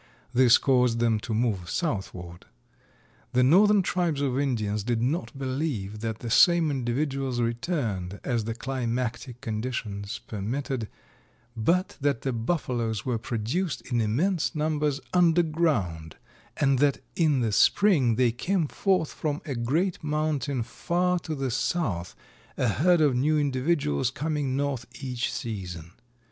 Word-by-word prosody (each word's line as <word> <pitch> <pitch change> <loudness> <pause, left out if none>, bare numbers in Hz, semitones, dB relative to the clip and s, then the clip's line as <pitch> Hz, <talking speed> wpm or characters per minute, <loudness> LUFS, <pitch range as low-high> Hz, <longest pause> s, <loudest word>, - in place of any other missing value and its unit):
This 125 -1 +6
caused 125 -3 +2
them 115 -2 +2
to 115 - -7
move 110 -6 0
southward. 95 - -4 0.9
The 125 0 +4
northern 200 +8 +5
tribes 170 -5 0
of 135 -2 0
Indians 110 -7 -1
did 120 +1 0
not 140 +5 -2
believe 130 -7 -3
that 110 0 -4
the 120 - -4
same 170 +2 +5
individuals 135 0 -1
returned, 115 - -2
as 120 -5 -1
the 115 0 -3
climatic 125 -1 -3
conditions 110 -2 -4
permitted, 115 +3 -4 0.7
but 170 +12 +1
that 140 -4 +1
the 135 - -1
Buffaloes 115 - -2
were 125 -3 -1
produced 125 - -2
in 120 -1 +2
immense 160 - 0
numbers 150 -2 0
under 175 -1 +4
ground 115 - -1 0.4
and 135 -3 +2
that 140 -1 +3 0.2
in 150 -6 +2
the 115 -2 0
spring 140 - +4
they 125 0 +3
came 170 - 0
forth 185 -1 0
from 150 -2 -2
a 145 - -3
great 150 +11 -1
mountain 150 -4 -1
far 180 +7 0
to 160 -2 -5
the 135 -2 -2
south, 110 - -1 0.4
a - - +1
herd 170 - +3
of 145 -4 +3
new 150 +5 +2
individuals 135 - +1
coming 145 -1 -2
north 140 -4 -2
each 125 -3 -2
season. 90 -7 -6
130 Hz, 135 wpm, -27 LUFS, 115-155 Hz, 0.9 s, This